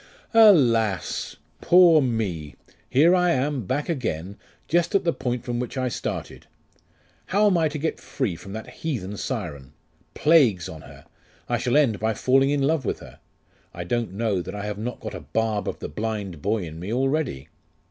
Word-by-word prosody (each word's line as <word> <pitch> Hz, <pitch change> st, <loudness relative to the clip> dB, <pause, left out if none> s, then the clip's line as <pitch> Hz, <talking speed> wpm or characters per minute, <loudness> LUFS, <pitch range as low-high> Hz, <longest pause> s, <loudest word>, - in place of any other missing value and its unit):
'Alas! 125 Hz, -, +4 dB, 0.3 s
poor 175 Hz, -3 st, +6 dB
me! 100 Hz, -, -2 dB, 0.3 s
Here 160 Hz, +7 st, +5 dB
I 180 Hz, -1 st, +3 dB
am, 130 Hz, -5 st, -1 dB
back 145 Hz, +3 st, -1 dB
again 100 Hz, -, -3 dB, 0.3 s
just 175 Hz, +5 st, +1 dB
at 195 Hz, -, +3 dB
the 170 Hz, -, +1 dB
point 125 Hz, -1 st, -3 dB
from 120 Hz, -1 st, -2 dB
which 125 Hz, +2 st, -4 dB
I 130 Hz, -1 st, 0 dB
started!.... -, -, -5 dB, 0.8 s
How 205 Hz, +3 st, +2 dB
am 200 Hz, -3 st, +4 dB
I 165 Hz, -2 st, +3 dB
to 150 Hz, 0 st, -4 dB
get 160 Hz, +2 st, -2 dB
free 120 Hz, -11 st, -3 dB
from 95 Hz, -, -11 dB
that 110 Hz, +1 st, -6 dB
heathen 110 Hz, -, -4 dB
Siren? 80 Hz, -, -5 dB, 0.4 s
Plagues 135 Hz, -, +4 dB
on 80 Hz, -, -9 dB
her! 70 Hz, 0 st, -14 dB, 0.4 s
I 120 Hz, -1 st, 0 dB
shall 125 Hz, +3 st, +1 dB
end 125 Hz, -9 st, +3 dB
by 110 Hz, 0 st, 0 dB
falling 135 Hz, +4 st, +3 dB
in 145 Hz, -1 st, +1 dB
love 150 Hz, 0 st, +1 dB
with -, -, -2 dB
her.... -, -, -13 dB, 0.6 s
I 85 Hz, -, -4 dB
don't 115 Hz, +1 st, -2 dB
know 105 Hz, -3 st, 0 dB
that 90 Hz, -, -7 dB
I 105 Hz, 0 st, -5 dB
have 105 Hz, -1 st, -4 dB
not 120 Hz, +2 st, -4 dB
got -, -, -7 dB
a -, -, -5 dB
barb 110 Hz, -2 st, -1 dB
of -, -, -5 dB
the -, -, -6 dB
blind 100 Hz, -3 st, -4 dB
boy 105 Hz, 0 st, 0 dB
in 80 Hz, -1 st, -8 dB
me 90 Hz, +5 st, -5 dB
already. 135 Hz, -, -1 dB
120 Hz, 185 wpm, -24 LUFS, 100-145 Hz, 0.8 s, poor